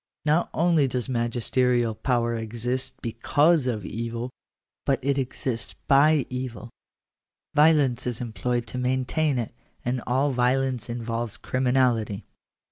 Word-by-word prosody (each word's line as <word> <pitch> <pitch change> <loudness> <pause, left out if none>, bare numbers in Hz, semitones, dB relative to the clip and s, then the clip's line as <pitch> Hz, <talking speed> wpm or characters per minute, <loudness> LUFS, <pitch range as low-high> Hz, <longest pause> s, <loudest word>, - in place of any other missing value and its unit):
Not 155 +3 +2
only 165 -4 +3
does 125 -1 -2
magisterial 120 -1 +1
power 120 0 0
exist 120 +3 -2
because 145 +6 +2
of 110 -5 -2
evil, 115 +2 -4 0.5
but 135 - +2
it 140 0 +1
exists 125 -2 -3
by 145 +1 +5
evil.. 125 -2 -6 0.8
Violence 145 -5 +4
is 120 -2 -2
employed 120 0 -2
to 125 - -4
maintain 130 +3 0
it; 115 -3 -3 0.3
and 125 0 -1
all 135 +3 +2
violence 125 -1 0
involves 115 -1 -3
criminality. 125 -5 +1
125 Hz, 120 wpm, -25 LUFS, 115-135 Hz, 0.8 s, by